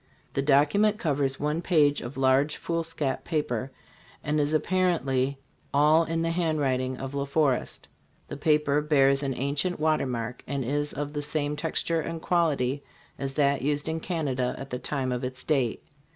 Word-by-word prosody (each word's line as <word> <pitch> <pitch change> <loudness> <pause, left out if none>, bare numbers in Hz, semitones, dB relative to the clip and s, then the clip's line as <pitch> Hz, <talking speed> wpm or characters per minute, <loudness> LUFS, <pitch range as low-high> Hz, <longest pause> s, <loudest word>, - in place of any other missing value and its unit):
The 135 - 0
document 150 +10 +3
covers 140 - 0
one 150 +3 -1
page 150 -5 +3
of 120 +3 -7
large 135 +3 +3
foolscap 165 -4 -2
paper 135 -6 -2 0.5
and 150 +1 0
is 145 0 +1
apparently 155 -6 +1 0.4
all 155 +3 +5
in 165 0 -1
the 165 - 0
handwriting 140 -7 0
of 135 +1 -6
La 140 0 -1
Forest. 140 -2 0 0.4
The - - -6
paper 150 -1 +2
bears 140 -2 +3
an 135 -2 -2
ancient 140 +8 -1
watermark 125 -6 -1
and 140 -1 -2
is 145 +3 -1
of 145 +1 -4
the 145 - -2
same 150 0 -1
texture 165 +2 -1
and 165 +1 -4
quality 145 -6 +1 0.4
as 135 -1 -3
that 140 -1 +2
used 145 +2 -1
in 160 0 -1
Canada 140 -8 -1
at 135 +1 -8
the 125 - -3
time 130 -1 -2
of 125 +1 -2
its 125 0 -4
date. 135 -7 0
145 Hz, 165 wpm, -27 LUFS, 135-155 Hz, 0.5 s, all